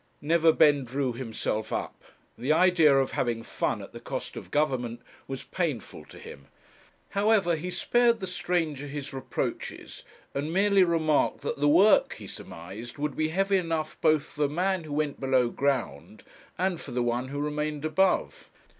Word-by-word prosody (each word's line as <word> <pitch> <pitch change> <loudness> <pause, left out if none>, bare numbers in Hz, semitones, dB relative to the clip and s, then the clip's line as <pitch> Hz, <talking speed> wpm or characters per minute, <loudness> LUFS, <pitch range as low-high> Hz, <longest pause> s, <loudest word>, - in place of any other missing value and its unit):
Neverbend 150 -3 +4
drew 130 0 -1
himself 110 -3 -3
up. - - -4 0.3
The 125 +6 -1
idea 165 -4 +5
of 135 -1 +1
having 115 -2 -1
fun - - -2
at - - -12
the - - -8
cost - - -5
of - - -8
Government 130 -6 0 0.3
was 135 -1 -5
painful 155 - -4
to - - -14
him; 70 0 -11 0.6
however, 200 -4 +2
he 170 +3 -5
spared 235 +5 +2
the 190 - -4
stranger 175 -5 -2
his 145 0 -6
reproaches, 135 - -5 0.3
and 145 +3 -2
merely 195 +1 +4
remarked 160 -4 +1
that - - -3
the 145 - +3
work 190 +8 +5
he - - -10
surmised 100 - -8
would 145 -1 -2
be 155 - +1
heavy 195 +4 +1
enough 165 -3 -2
both 155 -2 +4
for 150 - -9
the 145 - +3
man 180 +2 0
who 150 - -6
went 150 -1 -1
below 130 -3 +2
ground, 110 - -2 0.3
and 185 -2 -1
for - - -9
the 125 0 -1
one 120 +2 -1
who 140 +2 -5
remained 150 0 -2
above. 180 +5 +1
150 Hz, 165 wpm, -27 LUFS, 130-175 Hz, 0.6 s, idea